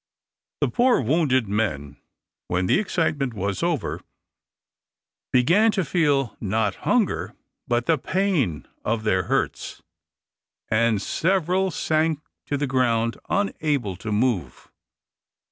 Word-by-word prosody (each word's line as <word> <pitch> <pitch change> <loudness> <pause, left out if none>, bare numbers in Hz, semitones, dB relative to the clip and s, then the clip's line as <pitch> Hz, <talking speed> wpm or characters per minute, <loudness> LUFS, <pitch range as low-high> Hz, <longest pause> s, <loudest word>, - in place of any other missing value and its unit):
The - - +3
poor 250 0 +3
wounded 130 -2 +2
men, 75 -10 -2 0.5
when 90 +1 0
the 90 - +3
excitement 150 - -1
was 100 0 -2
over, 170 -8 -1 1.3
began 170 - +4
to 190 -4 0
feel 145 - +1
not 105 -1 0 0.2
hunger, 235 -6 +1 0.3
but 120 0 +1
the 160 -1 +2
pain 160 - 0 0.2
of 110 0 -1
their 95 -4 +1
hurts, - - -2 0.9
and 110 -1 +2
several 185 - +1
sank 155 -2 0 0.3
to 145 - -1
the 145 - -1
ground 120 -3 +1
unable 150 - 0
to 105 +3 -5
move. 110 -3 -1
130 Hz, 110 wpm, -24 LUFS, 110-165 Hz, 1.3 s, began